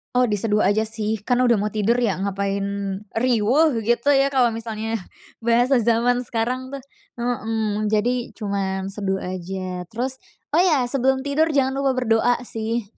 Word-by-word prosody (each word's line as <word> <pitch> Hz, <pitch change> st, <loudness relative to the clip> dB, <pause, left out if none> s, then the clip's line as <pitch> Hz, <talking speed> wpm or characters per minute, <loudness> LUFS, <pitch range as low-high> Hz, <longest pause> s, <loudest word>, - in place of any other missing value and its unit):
Oh, 250 Hz, 0 st, +4 dB
diseduh 210 Hz, 0 st, +1 dB
aja 205 Hz, +2 st, +3 dB
sih, 220 Hz, -1 st, -3 dB
karena 250 Hz, +2 st, +2 dB
udah 235 Hz, -, +5 dB
mau 210 Hz, 0 st, -1 dB
tidur 215 Hz, +2 st, +1 dB
ya, 230 Hz, -7 st, 0 dB
ngapain 200 Hz, 0 st, -1 dB, 0.5 s
riweuh, 250 Hz, +6 st, +3 dB
gitu 235 Hz, +5 st, +2 dB
ya, 275 Hz, 0 st, +4 dB
kalo 255 Hz, -4 st, +2 dB
misalnya, 225 Hz, -1 st, -4 dB, 0.4 s
bahasa 240 Hz, +3 st, +3 dB
zaman 235 Hz, +2 st, +2 dB
sekarang, 250 Hz, +3 st, -2 dB
tuh. 275 Hz, 0 st, -8 dB, 0.3 s
Mhm, 220 Hz, -3 st, -1 dB
jadi 235 Hz, +4 st, 0 dB
cuman 195 Hz, -2 st, -3 dB
seduh 195 Hz, -1 st, -2 dB
aja 185 Hz, 0 st, -5 dB
terus, 255 Hz, +6 st, -4 dB, 0.3 s
oh, 315 Hz, -, +3 dB
ya, 320 Hz, -8 st, +4 dB
sebelum 265 Hz, 0 st, +1 dB
tidur 285 Hz, +3 st, +2 dB
jangan 270 Hz, 0 st, +1 dB
lupa 270 Hz, -2 st, +1 dB
berdoa, 240 Hz, 0 st, +2 dB
sih. 225 Hz, -2 st, -4 dB
230 Hz, 155 wpm, -22 LUFS, 210-255 Hz, 0.5 s, udah